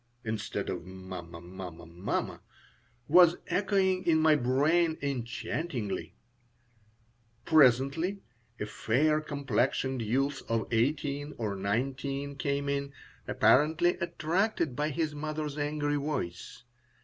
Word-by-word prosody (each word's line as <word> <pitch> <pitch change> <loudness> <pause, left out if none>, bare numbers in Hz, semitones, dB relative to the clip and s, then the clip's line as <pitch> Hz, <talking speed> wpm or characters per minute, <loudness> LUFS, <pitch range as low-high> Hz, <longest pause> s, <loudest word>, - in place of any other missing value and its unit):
(instead 110 -2 -3
of - - -3
"Mamma! 95 -2 -8
Mamma! 90 -1 -9
Mamma!") 85 +4 -3 0.7
was 175 +2 +7
echoing 190 -2 +1
in 160 -2 +5
my 155 -1 +5
brain 155 +6 +2
enchantingly 125 - -3 1.3
Presently 155 +6 +3 0.4
a - - -2
fair 150 +9 +1
complexioned 135 -2 -1
youth 135 +6 0
of 115 -1 +1
eighteen 145 +4 0
or 105 -4 -2
nineteen 135 +7 -2
came 140 0 -1
in, 140 0 -1 0.4
apparently 160 +5 +4
attracted 170 - 0
by 150 +3 0
his 155 +1 -1
mother's 150 0 -4
angry 145 0 -1
voice. 125 - -4
140 Hz, 100 wpm, -30 LUFS, 115-155 Hz, 1.3 s, was